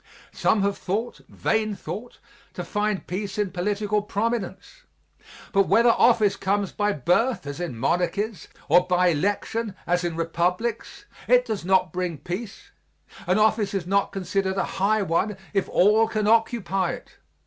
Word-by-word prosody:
Some 205 -2 +1
have 200 0 -1
thought, 215 +6 -3
vain 215 -1 -1
thought, 225 +5 -7 0.4
to - - -4
find 210 -2 -2
peace 195 +2 -4
in 205 -3 0
political 205 +3 -1
prominence; 210 - -3 0.7
but 195 -3 +3
whether 235 +1 +5
office 220 -4 +4
comes 195 0 -1
by 210 0 0
birth, 190 - +1
as 145 +2 -6
in 170 -9 -4
monarchies, 180 - -1 0.2
or 175 +3 +4
by 180 0 +3
election, 205 +5 -1
as 175 0 +1
in 170 -2 -2
republics, 180 +7 -2 0.2
it 250 0 +5
does 220 -6 -3
not 185 -2 +2
bring 180 -3 -2
peace. 195 +7 -7 0.6
An 180 +2 +3
office 215 -1 +2
is 190 -3 -2
not 200 +2 +1
considered 190 0 -2
a 195 - +2 0.2
high 210 +1 +3
one 190 +3 0 0.2
if 195 -2 0
all 215 +4 +4
can 215 -1 -1
occupy 215 -4 +1
it. - - -11
200 Hz, 150 wpm, -24 LUFS, 180-215 Hz, 0.7 s, whether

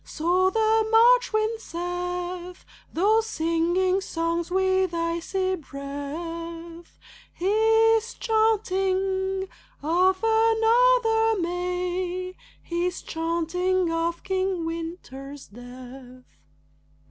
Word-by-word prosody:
So 360 +4 +1
the 440 +1 +2
March 485 +2 +5
wind 435 +1 0
saith. 355 0 -5 0.3
Though 420 +6 +3
singing 350 0 0
songs 335 -1 -2
with 375 -1 +1
icy 340 +3 -1
breath, 330 +4 -7 0.3
He's 445 +3 +2
chanting 385 -3 0 0.4
of 370 +5 +2
another 450 0 +3
May, 360 +1 -3 0.3
He's 350 +1 -2
chanting 340 +2 -1
of 335 +1 -2
King 380 -2 -1
Winter's 325 -5 -7
death. 250 +2 -12
360 Hz, 75 wpm, -25 LUFS, 335-410 Hz, 0.4 s, March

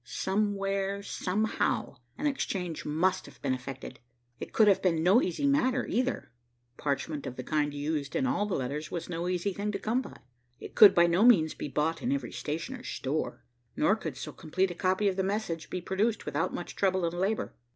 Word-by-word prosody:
Somewhere, 195 0 -1
somehow, 200 -7 -1 0.2
an - - -3
exchange 185 - -2
must 165 +5 +1
have - - -15
been 135 -2 +1
effected. 130 0 -7 0.4
It - - -6
could 220 - +5
have 200 - +5
been 165 -4 +2
no 195 +8 +6
easy 185 - -1
matter, 270 -2 +2
either. 255 +2 -1 0.4
Parchment 145 +1 -2
of 125 - -6
the 130 - -6
kind 150 +1 0
used 145 0 -3
in 265 - +1
all 260 -6 +1
the 200 - -1
letters 145 +4 -3
was 170 -1 -5
no 170 0 -2
easy 185 +2 -1
thing 205 +2 -2
to - - 0
come 225 +6 0
by. - - -10 0.4
It - - -9
could 210 - +9
by 170 - +6
no 170 +4 +3
means 180 -11 +6
be - - -5
bought 150 +3 -1
in 250 - -1
every 280 0 -2
stationer's 170 - -5
store, 145 +4 -3 0.3
nor 195 +7 +3
could 160 -11 -6
so - - -6
complete 185 +4 -1
a - - -4
copy 185 +3 +1
of 190 -1 0
the 190 - +1
message 190 -5 -2
be 180 - -3
produced 205 +5 0
without 150 +2 -1
much 175 - -6
trouble 190 -2 +1
and 165 - -1
labor. 195 +5 -1
185 Hz, 200 wpm, -29 LUFS, 155-210 Hz, 0.4 s, could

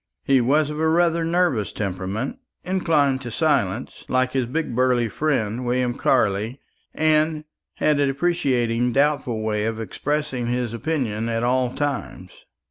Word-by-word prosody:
He 135 -2 +3
was 145 +5 +2
of 150 - -5
a 160 0 +2
rather 170 0 +2
nervous 165 - +1
temperament, 100 - -3 0.2
inclined 155 -8 +1
to 120 - -6
silence, - - 0
like 130 0 +1
his 130 -3 0
big 145 -1 -2
burly 125 -2 +2
friend, 120 -3 -1
William 125 0 0
Carley, 110 +4 +1 0.4
and 155 0 +2 0.3
had 150 -1 +2
a 140 - +3
deprecating 130 -6 0
doubtful 140 -6 +1
way 105 -1 -1
of 115 0 -2
expressing 135 +2 -2
his 120 -1 -1
opinion 115 -5 -2
at 115 0 -1
all 125 0 +1
times. 145 -1 -3
130 Hz, 140 wpm, -23 LUFS, 115-150 Hz, 0.4 s, He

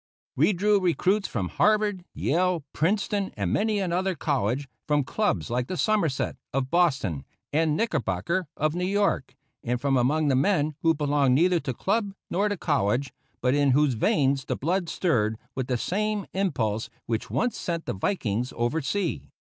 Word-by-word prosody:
We - - +4
drew 205 +2 +3
recruits 190 +3 +1
from 90 -2 -3
Harvard, 210 -3 +2
Yale, 175 +1 +1
Princeton, 200 +3 0
and 95 -4 -1
many 215 0 +1
another 185 0 0
college; 135 -3 -1 0.2
from 150 -1 +2
clubs 130 - -1
like 125 +1 0
the 185 - -4
Somerset, 170 -12 0
of 135 0 -2
Boston, 130 - +1 0.3
and 155 0 +2
Knickerbocker, 160 - -1
of 155 +1 +1
New 180 +1 -2
York; 200 -8 0 0.3
and 125 0 -1
from 135 0 +1
among 145 +5 +2
the 135 - +3
men 150 +2 +2
who 165 -1 +3
belonged 145 -3 +2
neither 175 +4 +3
to 135 -3 -3
club 200 - -1 0.2
nor 200 +4 +1
to 205 - -2
college, 135 - 0 0.3
but 125 0 +2
in 140 -2 +3
whose 145 -1 +3
veins 135 +3 +1
the - - -1
blood 175 +3 -1
stirred 110 - +1 0.2
with 130 -2 -3
the 125 - 0
same 210 - -1
impulse 115 - -1 0.2
which 115 -1 -2
once 245 -1 0
sent 170 -2 -3
the - - -2
Vikings 120 - -1
over 120 +7 0
sea. 165 - -2
155 Hz, 165 wpm, -26 LUFS, 130-190 Hz, 0.3 s, We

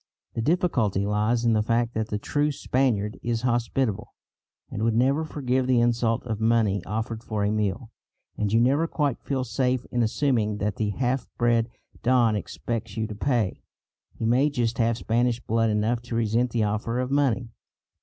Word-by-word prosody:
The 115 - -2
difficulty 125 - +1
lies 105 +3 +1
in 115 - +4
the 110 - +3
fact 115 +2 0
that 110 -1 -1
the 105 - -2
true 145 +7 0
Spaniard 125 -7 0
is 115 0 -2
hospitable, 120 -2 -1 0.6
and 105 - -4
would 115 0 +1
never 135 +6 +2
forgive 130 -4 -1
the 130 -2 +4
insult 120 -1 +1
of 110 -3 -3
money 110 -4 +2
offered 110 +2 -4
for 110 -3 -2
a 100 - +1
meal, 110 +2 -2 0.4
and 105 -1 -1
you 115 - +4
never 140 +7 +3
quite 145 -6 -1
feel 135 -2 -2
safe 125 +1 0
in 120 - +1
assuming 110 -3 +1
that 105 -1 -2
the 105 -2 0
half 125 +5 -1
bred 120 -1 +2 0.3
don 120 -3 +3
expects 115 +4 -4
you 110 - 0
to 110 - -6
pay. 115 -3 0 0.5
He - - -3
may 130 +6 +3
just 120 -4 -1
have 115 0 +2
Spanish 120 +1 +1
blood 115 -1 +1
enough 110 +3 0
to 120 -1 -6
resent 115 +2 +1
the 115 -1 0
offer 110 +3 -1
of 130 +1 -2
money. 130 -4 +1
115 Hz, 180 wpm, -25 LUFS, 110-125 Hz, 0.6 s, in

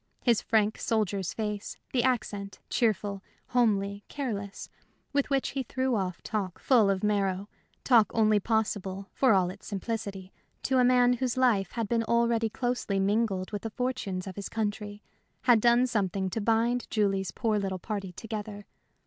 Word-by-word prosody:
His 235 -3 +3
frank 220 -1 +1
soldier's 205 -5 0
face, 210 -1 -4 0.2
the 250 - +3
accent, 205 -6 -1
cheerful, 205 -4 0 0.3
homely, 205 -4 +1
careless, 205 -8 -4 0.5
with 280 0 +1
which 275 -1 +1
he 275 - -2
threw 260 +1 -1
off 185 -4 -3
talk 200 -5 -3
full 230 -7 +4
of 195 0 0
marrow, 200 -2 0 0.4
talk 235 -5 +5
only 215 -2 +4
possible 200 -3 -2
for 260 -4 +4
all 180 -2 +2
its 195 +1 -13
simplicity 200 -2 -4 0.3
to 260 -1 +2
a - - +5
man 245 0 +5
whose 250 0 -1
life 225 -7 +2
had 230 -3 -2
been 230 +1 +1
already 235 -1 +2
closely 240 -4 -1
mingled 195 -1 0
with 205 -2 -3
the 225 - -4
fortunes 210 -6 -3
of 190 -1 -8
his 200 - -5
country, 205 -1 -3 0.4
had 245 -4 +5
done 240 +2 +5
something 195 -5 -1
to 225 - -2
bind 230 +3 +1
Julie's 195 -3 +1
poor 215 +2 0
little 190 -2 -2
party 195 0 -4
together. 210 0 -6
215 Hz, 160 wpm, -28 LUFS, 195-235 Hz, 0.5 s, talk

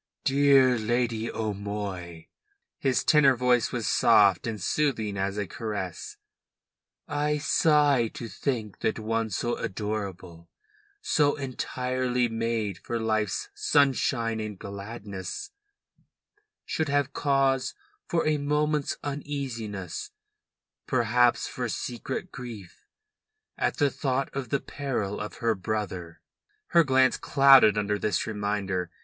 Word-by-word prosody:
"Dear 135 -3 +5
Lady 115 0 -1
O'Moy," 100 -5 -4 0.5
his 130 -2 +1
tenor 140 -4 +5
voice 125 -1 +2
was - - -2
soft 100 0 +4
and 110 -2 -3
soothing 110 -1 0
as 100 +1 -2
a 105 - -1
caress, 100 -3 -5 0.9
"I 150 0 0
sigh 145 -3 +3
to 120 - -6
think 110 -1 -3
that 110 - 0
one 115 0 -1
so 120 +4 -2
adorable, 95 -5 -5 0.5
so 150 - +2
entirely 125 -2 -1
made 115 -4 -2
for 115 +6 -3
life's 110 -2 -1
sunshine 130 -5 +2
and 105 -2 -5
gladness, 100 - -7 1.1
should 160 -2 -1
have 140 -1 +1
cause 135 -2 +1 0.3
for 170 - 0
a 155 -1 +2
moment's 150 0 0
uneasiness, 135 - -5 0.8
perhaps 120 -1 +2
for 125 -2 -4
secret 120 +1 -4
grief, 115 -7 -10 0.7
at - - -1
the 145 -2 +2
thought 135 -1 -2
of 135 -2 -4
the 140 - +1
peril 125 -10 -3
of 105 - -6
her 115 -1 +1
brother." 95 -4 -4 0.5
Her 170 -1 +6
glance 130 -2 +3
clouded 135 -6 +6
under 105 0 0
this 105 -4 0
reminder. 100 -4 -2
115 Hz, 115 wpm, -27 LUFS, 105-135 Hz, 1.1 s, Her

